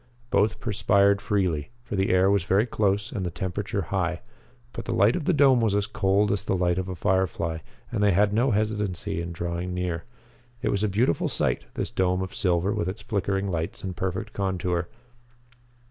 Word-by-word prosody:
Both 105 +2 +2
perspired 100 -2 +3
freely, 90 -8 0
for 105 - -5
the 95 0 +1
air 95 +1 +4
was 100 -1 +3
very 100 +4 +3
close 105 -3 0
and 95 - -3
the 90 - -1
temperature 95 +3 -3
high. 90 -3 0 0.5
But - - -6
the - - -2
light 100 +4 +4
of 175 - -3
the - - +3
dome 135 -6 +5
was 110 -3 +2
as 100 -1 +1
cold 100 0 +1
as 100 -1 +1
the 100 -2 -1
light 90 0 +1
of 95 0 -4
a 95 - -4
firefly 90 -3 0 0.3
and - - -1
they 105 - +5
had 100 +3 +3
no 120 +5 +3
hesitancy 105 -6 -1
in 85 0 -5
drawing 85 +1 -3
near. 90 -2 -2 0.6
It - - +1
was 100 +1 0
a 105 - +2
beautiful 100 -3 +1
sight, - - 0
this - - -3
dome 90 0 +1
of 95 - -7
silver 90 +2 +1
with 85 - -1
its 95 - -7
flickering 100 -2 -1
lights 80 -1 -3
and 95 -2 -4
perfect 95 +4 -3
contour. 90 -3 -1
95 Hz, 195 wpm, -26 LUFS, 90-105 Hz, 0.6 s, dome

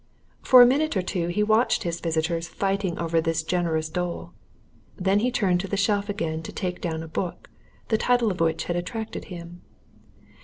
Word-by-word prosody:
For 250 -1 +8
a - - +8
minute 285 0 +2
or 185 - 0
two 175 -1 -2
he 180 +5 0
watched 220 +3 +2
his 170 -1 -3
visitors 165 0 -1
fighting 195 -2 -1
over 165 -1 +1
this 165 0 -1
generous 160 -2 0
dole; 175 +2 -4 0.6
then 195 +1 +2
he 245 +4 +1
turned 190 -7 +1
to 195 - -3
the 200 - -2
shelf 205 0 +1
again, 160 -6 -2
to 160 - -8
take 180 -1 -4
down 160 -2 -3
a - - -8
book, 175 +2 -5 0.4
the 220 - +2
title 245 -3 +2
of 180 - -6
which 165 -1 +1
had 175 - -3
attracted 215 +6 -4
him. 175 -1 -9
180 Hz, 190 wpm, -25 LUFS, 165-205 Hz, 0.6 s, For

